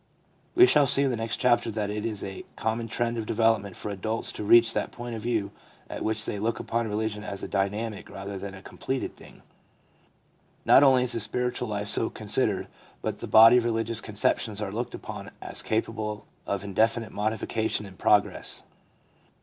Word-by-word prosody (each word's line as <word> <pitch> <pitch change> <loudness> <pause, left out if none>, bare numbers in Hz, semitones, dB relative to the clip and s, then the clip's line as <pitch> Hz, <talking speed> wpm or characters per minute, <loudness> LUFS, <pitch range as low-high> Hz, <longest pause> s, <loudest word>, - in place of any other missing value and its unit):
We 365 +1 +9
shall 145 - +4
see 140 +2 +5
in 135 - +1
the - - -1
next 115 -1 -2
chapter 120 -2 +2
that 105 -2 -2
it 105 +1 -3
is 105 -3 -4
a 95 -1 -6
common 115 +1 -2
trend 115 +1 -1
of 110 - -5
development 110 -4 +1
for 105 - -5
adults 110 +3 0
to - - -6
reach 115 +2 +6
that - - -2
point 120 0 -7
of 110 - -6
view 110 -3 -1 0.4
at - - -5
which 110 0 0
they 105 - -3
look 115 +3 -1
upon 115 0 -2
religion 105 0 -2
as 100 -2 -6
a - - -3
dynamic 105 +2 -2
rather 100 0 -7
than 100 0 -7
a 95 - -12
completed 130 0 -4
thing. - - -16 1.2
Not - - +7
only 130 -3 +5
is 125 - -1
the 115 - -1
spiritual 125 +2 -2
life 105 -1 -3
so - - +3
considered, - - -1 0.4
but - - -3
the - - -6
body 115 +2 +8
of 125 - +2
religious 115 -1 0
conceptions 105 0 0
are 105 -2 -3
looked 120 +4 -4
upon - - -8
as - - -2
capable 110 -1 -2 0.2
of 100 -1 -2
indefinite 110 +3 0
modification 110 0 -1
and 95 -3 -13
progress. - - +1
110 Hz, 190 wpm, -27 LUFS, 105-115 Hz, 1.2 s, We